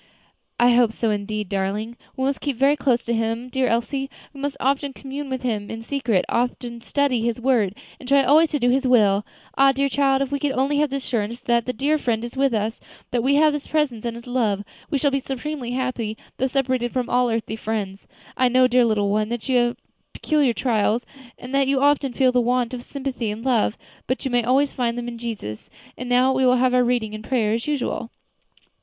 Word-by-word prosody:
"I 240 +1 +6
hope 235 -2 +4
so 225 -1 0
indeed, 210 0 -3
darling. 200 +4 -2 0.2
We 260 - -1
must 275 +1 -1
keep 285 -3 -2
very 275 +3 +4
close 250 -4 +1
to 235 - -1
Him, 225 +2 -2
dear 260 0 0
Elsie; 270 +4 -1 0.2
we 275 - -11
must 285 0 -3
often 275 +1 0
commune 275 +1 -7
with 260 -1 -4
Him 215 -5 -2
in 225 0 -6
secret; 240 -7 0
often 240 0 -2
study 270 -1 0
His 235 0 -1
word, 235 -6 +1 0.2
and 255 - -9
try 280 0 +5
always 310 +4 +5
to 295 - -1
do 245 -1 +3
His 265 +1 +1
will. 210 -5 +4 0.4
Ah! 275 0 +7
dear 275 +1 0
child, 275 0 +2
if 275 - -6
we 285 - -1
can 280 -1 0
only 275 +3 +1
have 300 0 +2
the 275 - -3
assurance 235 -4 -2
that 235 -1 +1
that 250 -3 -3
dear 295 +4 +1
Friend 235 -3 -1
is 240 - -9
with 270 0 +2
us 220 0 -1 0.3
that 245 - +1
we 270 +4 +2
have 305 +1 +4
His 295 -1 -4
presence 290 -8 0
and 235 -1 -3
His 235 - -10
love, 225 -5 0 0.3
we 290 - +1
shall 280 +1 +1
be 275 - +1
supremely 270 -1 -5
happy, 245 -4 -2 0.2
though 265 - +1
separated 255 -2 0
from 250 -2 -1
all 245 0 +2
earthly 225 -1 -2
friends. 210 -3 -4 0.3
I 255 - +3
know, 255 +1 +4
dear 250 -1 +4
little 205 -3 +1
one, 215 +1 0
that 240 +1 -4
you 260 -2 +3
have 240 0 +1 0.4
peculiar 295 -6 +1
trials, 230 -1 +1 0.3
and 250 +2 -9
that 275 -1 +3
you 270 0 +2
often 285 -1 +2
feel 255 0 +3
the 250 0 +3
want 245 0 0
of 250 - -4
sympathy 265 -5 -4
and 215 +4 -6
love; 235 -4 +2 0.3
but 260 +2 -2
you 265 - -1
may 245 -1 +2
always 270 +4 +2
find 240 -2 -1
them 240 0 -4
in 235 -1 -6
Jesus. 215 - -6 0.3
And 250 0 -6
now 250 +2 +4
we 260 0 +1
will 250 0 +5
have 255 0 +2
our 250 0 +4
reading 240 -3 0
and 215 0 -7
prayer 220 -4 +1
as 230 +4 -2
usual." 275 -5 -2
250 Hz, 225 wpm, -23 LUFS, 230-270 Hz, 0.4 s, Ah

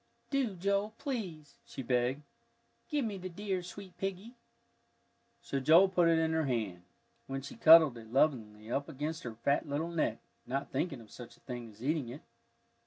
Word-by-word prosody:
"Do, 265 -8 0
Joel, 200 +4 0
please," 190 - -5
she 135 - -7
begged, 125 +3 0 0.7
"give 295 -5 0
me 205 -3 -4
the 185 0 -5
dear, 190 +1 -3
sweet 180 +1 -10
piggie." 195 +4 -4 1.1
So 140 - -2
Joel 165 +8 +6
put 180 -2 +3
it 165 - +4
in 160 0 +2
her 160 -1 +1
hand, 110 -8 -2 0.5
when 135 0 -4
she 140 - -8
cuddled 155 -6 +7
it 110 -1 -13
lovingly 115 -6 +1
up 140 +4 -1
against 155 +2 -4
her 115 -2 -6
fat 140 +6 0
little 150 +4 -1
neck, 155 -9 0 0.3
not 135 +2 -3
thinking 140 -9 -2
of 110 - -16
such 120 -2 -11
a - - -28
thing 120 -3 -7
as 110 +2 -14
eating 145 -3 0
it. 135 +5 -8
155 Hz, 175 wpm, -32 LUFS, 125-185 Hz, 1.1 s, cuddled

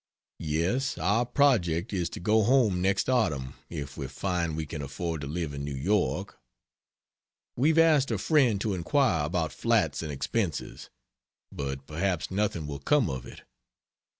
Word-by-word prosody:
Yes, 85 - -1
our 100 +8 +1
project 110 - +2
is 90 -3 -1
to - - -7
go 110 +5 +3
home 110 -5 +3
next 95 +1 +1
autumn 80 - 0 0.2
if 70 -5 -6
we 70 - -4
find 85 +2 -2
we 80 - -2
can 75 0 -6
afford 80 +3 -4
to 70 - -5
live 80 0 -3
in 70 0 -5
New 70 -1 -4
York. 95 +9 -1 1.2
We've 150 +6 +2
asked 155 -4 +5
a 110 - 0
friend 125 - +3
to 105 -2 0
inquire 90 - +1
about 85 0 -1
flats - - +1
and 80 -2 -4
expenses. 80 - -3 0.6
But 70 -1 -5
perhaps 85 +3 -2
nothing 95 -5 -1
will 70 -1 -5
come 145 - +2
of 65 -2 -6
it. - - -12
90 Hz, 155 wpm, -28 LUFS, 75-110 Hz, 1.2 s, asked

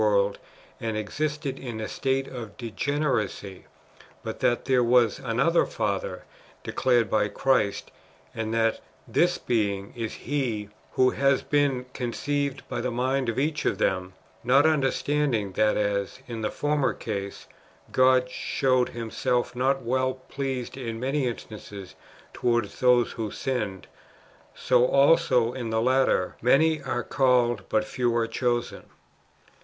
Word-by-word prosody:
world, 100 -1 +2 0.4
and 110 -2 -2
existed 145 +5 -3
in 120 -4 -6
a 110 - -3
state 135 0 -1
of 115 -5 -8
degeneracy; 115 -4 -2 0.6
but - - -5
that 120 - +1
there 130 -2 +3
was 120 -2 +3
another 135 +8 +2
Father - - -3 0.4
declared 120 -4 +2
by 105 -1 +2
Christ, 105 -1 0 0.4
and 110 -1 -3
that 115 0 +1 0.3
this - - +2
Being 100 -4 -1
is 115 -2 -4
He 120 -7 -2 0.2
who 130 0 +4
has 140 0 +2
been 140 -4 +1
conceived 140 +3 -2
by - - -3
the 125 - -1
mind 130 +1 0
of 115 - -3
each 150 +3 0
of - - +1
them; 95 0 0 0.3
not 135 +5 +5
understanding 140 -6 +1
that 105 +2 +2
as, 100 0 -1
in 115 -2 -5
the 105 - -1
former 145 -2 0
case, 100 -3 -5 0.5
God 130 0 +4
showed 130 0 0
Himself 120 +1 -2
not 135 +1 +1
well 130 +2 0
pleased 135 -2 -4
in 115 -4 -5
many 135 +2 0
instances 105 -4 -8 0.4
towards 120 -4 0
those 125 -1 +4
who 110 -3 -4
sinned, 105 -6 -3 0.7
so 125 -1 +3
also 135 -3 +4
in 120 -3 -4
the 110 0 +1
latter, 130 -6 +2
" - - -28
many 155 +2 +4
are 130 -2 -2
called, 125 -3 +2
but 110 -1 +1
few 120 0 -1
are 115 - +2
chosen." 120 +1 -2
125 Hz, 140 wpm, -26 LUFS, 110-135 Hz, 0.7 s, not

